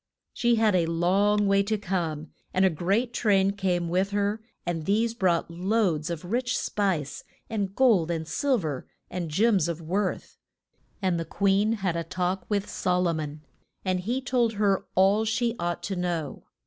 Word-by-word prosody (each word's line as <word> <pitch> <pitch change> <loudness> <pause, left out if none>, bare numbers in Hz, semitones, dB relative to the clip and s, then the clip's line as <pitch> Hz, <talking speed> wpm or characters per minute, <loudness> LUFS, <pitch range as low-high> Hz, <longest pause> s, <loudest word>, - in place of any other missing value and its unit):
She 240 -1 +2
had 220 -2 +3
a 175 -3 +2
long 195 +5 +2
way 195 0 +4
to 215 +2 0
come, 165 -6 -3 0.2
and 185 +1 +4
a 190 - +4
great 200 +10 0
train 195 -5 +3
came 185 -4 -1
with 185 +3 +1
her, 205 +1 -1 0.2
and 165 -3 -2
these 225 +3 +2
brought 175 -6 +1
loads 180 -3 0
of 170 0 -5
rich 245 +6 0
spice, 180 -9 -1 0.3
and 200 -3 -2
gold 220 -11 +4
and 165 -2 -2
sil 265 - +1
ver 150 - -4 0.2
and 175 -3 -3
gems 195 +1 +3
of 170 -1 -3
worth. 185 +4 -3 0.6
And 180 -3 +1
the 165 - -3
queen 200 +4 +2
had 175 -3 +1
a 170 - -1
talk 185 +2 -2
with 205 -1 0
Sol 180 -1 0
o - - +1
mon 150 -1 -5 0.4
and 185 -1 +1
he 240 +8 -2
told 240 -3 +1
her 200 -2 +1
all 195 +3 +4
she 230 +1 0
ought 175 0 -2
to 195 - -3
know. 175 -5 -3
190 Hz, 175 wpm, -26 LUFS, 170-210 Hz, 0.6 s, way